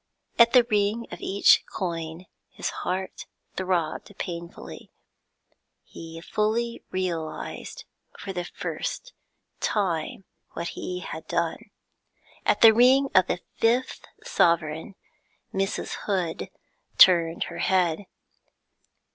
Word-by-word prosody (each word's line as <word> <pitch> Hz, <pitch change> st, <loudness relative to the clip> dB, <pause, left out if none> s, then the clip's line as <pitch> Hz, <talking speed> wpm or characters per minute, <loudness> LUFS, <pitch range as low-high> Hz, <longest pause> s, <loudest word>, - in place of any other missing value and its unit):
At 235 Hz, 0 st, +7 dB
the 250 Hz, -2 st, +8 dB
ring 215 Hz, +1 st, 0 dB
of -, -, -8 dB
each 200 Hz, +1 st, +5 dB
coin 165 Hz, -1 st, -4 dB, 0.2 s
his -, -, -4 dB
heart 185 Hz, +1 st, -3 dB, 0.3 s
throbbed 185 Hz, +1 st, -2 dB
painfully. 170 Hz, -2 st, -7 dB, 0.9 s
He 165 Hz, 0 st, -10 dB
fully 225 Hz, +5 st, -1 dB
realised, 170 Hz, -4 st, -4 dB, 0.3 s
for 195 Hz, -, -6 dB
the 175 Hz, -1 st, -3 dB
first -, -, -5 dB, 0.5 s
time, 185 Hz, -4 st, -1 dB, 0.3 s
what 170 Hz, 0 st, -4 dB
he 180 Hz, 0 st, -5 dB
had 160 Hz, -2 st, -7 dB
done. 170 Hz, -1 st, -2 dB, 0.8 s
At -, -, +3 dB
the 225 Hz, -1 st, +10 dB
ring 260 Hz, +4 st, +5 dB
of 185 Hz, -1 st, +5 dB
the 180 Hz, -, -2 dB, 0.2 s
fifth 240 Hz, +3 st, +1 dB, 0.2 s
sovereign 160 Hz, +1 st, +1 dB, 0.6 s
Mrs. 195 Hz, +1 st, -2 dB
Hood 180 Hz, -5 st, -1 dB, 0.5 s
turned 170 Hz, -2 st, +6 dB
her -, -, -7 dB
head. 185 Hz, 0 st, +1 dB
185 Hz, 105 wpm, -26 LUFS, 170-210 Hz, 0.9 s, the